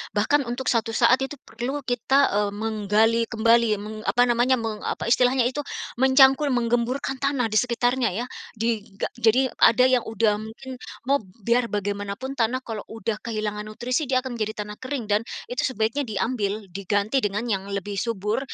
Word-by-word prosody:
Bahkan 265 Hz, +6 st, +2 dB
untuk 245 Hz, +2 st, -1 dB
suatu 225 Hz, -1 st, 0 dB
saat 245 Hz, +2 st, +5 dB
itu 270 Hz, +2 st, -3 dB
perlu 250 Hz, +6 st, -4 dB
kita, 250 Hz, +2 st, +1 dB
eee, 205 Hz, 0 st, +1 dB
menggali 220 Hz, +1 st, +1 dB
kembali 230 Hz, +1 st, +3 dB
meng 210 Hz, +2 st, -7 dB
apa 245 Hz, -, +4 dB
namanya, 245 Hz, +1 st, +3 dB
meng 225 Hz, -3 st, -4 dB
apa 230 Hz, -, -3 dB
istilahnya 250 Hz, +1 st, +4 dB
itu 250 Hz, +4 st, -1 dB, 0.4 s
mencangkul 265 Hz, +2 st, +5 dB
menggemburkan 240 Hz, +3 st, 0 dB
tanah 275 Hz, -5 st, 0 dB
di 215 Hz, -, +2 dB
sekitarnya 245 Hz, 0 st, +1 dB
ya. 235 Hz, +4 st, -2 dB, 0.3 s
Diga 215 Hz, -3 st, -2 dB
jadi 245 Hz, +3 st, +3 dB
ada 235 Hz, +2 st, +6 dB
yang 255 Hz, -2 st, +3 dB
udah 215 Hz, -1 st, +1 dB
mungkin 245 Hz, +4 st, -9 dB, 0.2 s
mob 275 Hz, +3 st, +2 dB, 0.2 s
biar 235 Hz, +3 st, +2 dB
bagaimanapun 205 Hz, +4 st, -3 dB
tanah 245 Hz, +3 st, +1 dB
kalau 225 Hz, -4 st, -5 dB
udah 225 Hz, -1 st, -4 dB
kehilangan 215 Hz, -2 st, -4 dB
nutrisi 250 Hz, +7 st, -2 dB
dia 255 Hz, -1 st, +1 dB
akan 245 Hz, -3 st, -6 dB
menjadi 215 Hz, 0 st, -2 dB
tanah 210 Hz, 0 st, -9 dB
kering 260 Hz, -1 st, -4 dB
dan 205 Hz, -, +4 dB, 0.3 s
itu 290 Hz, +4 st, 0 dB
sebaiknya 245 Hz, +3 st, -1 dB
diambil, 215 Hz, -1 st, -2 dB
diganti 200 Hz, +6 st, 0 dB
dengan 210 Hz, -1 st, -1 dB
yang 195 Hz, -1 st, -2 dB
lebih 200 Hz, 0 st, -3 dB
subur, 210 Hz, 0 st, -1 dB
230 Hz, 165 wpm, -24 LUFS, 215-255 Hz, 0.4 s, ada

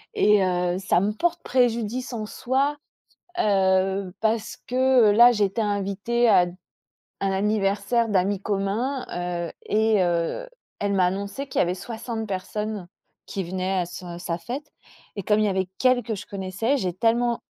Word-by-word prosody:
et 210 Hz, -, +4 dB
heu, 180 Hz, -1 st, 0 dB
ça 180 Hz, -2 st, +2 dB
me 205 Hz, +2 st, +1 dB
porte 345 Hz, +9 st, -1 dB
préjudice 245 Hz, 0 st, 0 dB
en 220 Hz, -2 st, -3 dB
soi, 270 Hz, +6 st, 0 dB, 0.6 s
heu, 190 Hz, -1 st, +2 dB
parce 220 Hz, 0 st, 0 dB
que 255 Hz, -3 st, +4 dB
là 240 Hz, +4 st, +8 dB
j'étais 205 Hz, 0 st, 0 dB
invitée 205 Hz, +3 st, 0 dB
à 180 Hz, -, +7 dB, 0.8 s
un 195 Hz, 0 st, +1 dB
anniversaire 205 Hz, +3 st, +1 dB
d'amis 195 Hz, 0 st, +1 dB
communs, 210 Hz, +7 st, -1 dB, 0.4 s
heu -, -, -8 dB
et 215 Hz, -2 st, +3 dB
heu, 175 Hz, -, -1 dB, 0.3 s
elle 200 Hz, 0 st, 0 dB
m'a 185 Hz, -2 st, +3 dB
annoncé 200 Hz, +8 st, -4 dB
qu'il -, -, -7 dB
y -, -, +6 dB
avait 175 Hz, 0 st, -1 dB
60 225 Hz, +2 st, -5 dB
personnes 205 Hz, 0 st, -4 dB, 0.4 s
qui 195 Hz, -, -3 dB
venaient 185 Hz, +2 st, -2 dB
à 175 Hz, -, 0 dB
sa 175 Hz, -1 st, -8 dB
sa 170 Hz, -1 st, -3 dB
fête, 265 Hz, -, -7 dB, 0.4 s
et 200 Hz, -, -4 dB
comme 210 Hz, +3 st, +2 dB
il 215 Hz, -, +3 dB
y -, -, +2 dB
avait 190 Hz, -1 st, -1 dB
qu'elle 255 Hz, -1 st, +3 dB
que 220 Hz, -1 st, -3 dB
je 205 Hz, -, -8 dB
connaissais, 195 Hz, +6 st, -1 dB
j'ai 185 Hz, -8 st, -1 dB
tellement 235 Hz, +4 st, +1 dB
210 Hz, 160 wpm, -24 LUFS, 190-235 Hz, 0.8 s, là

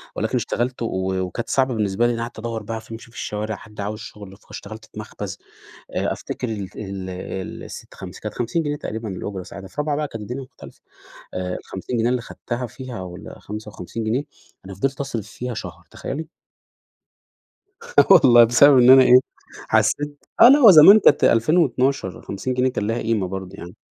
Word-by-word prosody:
ولكن -, -, -2 dB
اشتغلت 125 Hz, +1 st, -2 dB
و 95 Hz, -4 st, -2 dB
وكانت 95 Hz, +5 st, -5 dB
صعبة 130 Hz, -1 st, +1 dB
بالنسبة 105 Hz, 0 st, 0 dB
لي 120 Hz, -, 0 dB
لإن 115 Hz, -, -4 dB
قعَدت 115 Hz, -1 st, -6 dB
أدوّر 115 Hz, -1 st, -4 dB
بقى 110 Hz, +1 st, -5 dB
ف 110 Hz, -, -17 dB
أمشي 115 Hz, +1 st, -10 dB
في 120 Hz, -, -15 dB
الشوارع، 105 Hz, +1 st, -4 dB
حد 105 Hz, 0 st, -10 dB
عاوز 105 Hz, +1 st, -4 dB
شُغل، 100 Hz, -3 st, -11 dB
فاشتغلت 110 Hz, +1 st, -10 dB
في -, -, -11 dB
مخبز، -, -, -7 dB, 0.6 s
آآ -, -, 0 dB
أفتكَر 125 Hz, -, -6 dB
ال 100 Hz, -4 st, -5 dB
ال 95 Hz, -2 st, -6 dB, 0.5 s
ال -, -, -10 dB
سِت -, -, -10 dB
خمس -, -, -10 dB
كانت -, -, -6 dB
50 125 Hz, +8 st, -1 dB
جنيه 145 Hz, -1 st, -2 dB
تقريبًا 110 Hz, -6 st, -6 dB
الأجرة 95 Hz, 0 st, -5 dB
ساعتها، 95 Hz, +2 st, -10 dB
في -, -, -22 dB
رابعة 150 Hz, -1 st, -1 dB
بقى 150 Hz, 0 st, -2 dB
كانت 115 Hz, -5 st, -8 dB
الدنيا 125 Hz, +6 st, -6 dB
مختلفة، 130 Hz, -, -15 dB, 0.5 s
آآ 90 Hz, 0 st, -3 dB
ال50 95 Hz, +6 st, -6 dB
جنيه 115 Hz, +1 st, +2 dB
اللي 125 Hz, 0 st, 0 dB
خَدتها 120 Hz, +1 st, -5 dB
فيها 125 Hz, -2 st, -8 dB
والّا 90 Hz, -1 st, -10 dB
55 105 Hz, 0 st, -7 dB
جنيه. 115 Hz, +5 st, 0 dB, 0.4 s
أنا 95 Hz, 0 st, -9 dB
فضِلت 135 Hz, +9 st, -2 dB
أصرِف 120 Hz, -7 st, -4 dB
فيها 125 Hz, +3 st, -6 dB
شهر، -, -, -8 dB
تخيّلي. 155 Hz, +3 st, -6 dB, 1.7 s
آه -, -, +7 dB
والله 125 Hz, -10 st, +8 dB
بسبب 130 Hz, +4 st, +6 dB
إن 125 Hz, 0 st, +6 dB
أنا 130 Hz, 0 st, +9 dB
إيه، 125 Hz, 0 st, +7 dB, 0.5 s
حسّيت 145 Hz, 0 st, +1 dB, 0.2 s
آه، 235 Hz, -, +11 dB
اللي 275 Hz, +3 st, +8 dB
هو 240 Hz, -8 st, +9 dB
زمان 185 Hz, +6 st, +9 dB
كانت 145 Hz, -, +4 dB
2012 130 Hz, -, +2 dB
ال50 100 Hz, +6 st, -4 dB
جنيه 125 Hz, +1 st, +1 dB
كان 105 Hz, -5 st, -3 dB
ليها 115 Hz, +2 st, -1 dB
قيمة 110 Hz, -4 st, 0 dB
برضه 95 Hz, 0 st, -7 dB
يعني. 85 Hz, +1 st, -10 dB
115 Hz, 190 wpm, -22 LUFS, 105-130 Hz, 1.7 s, آه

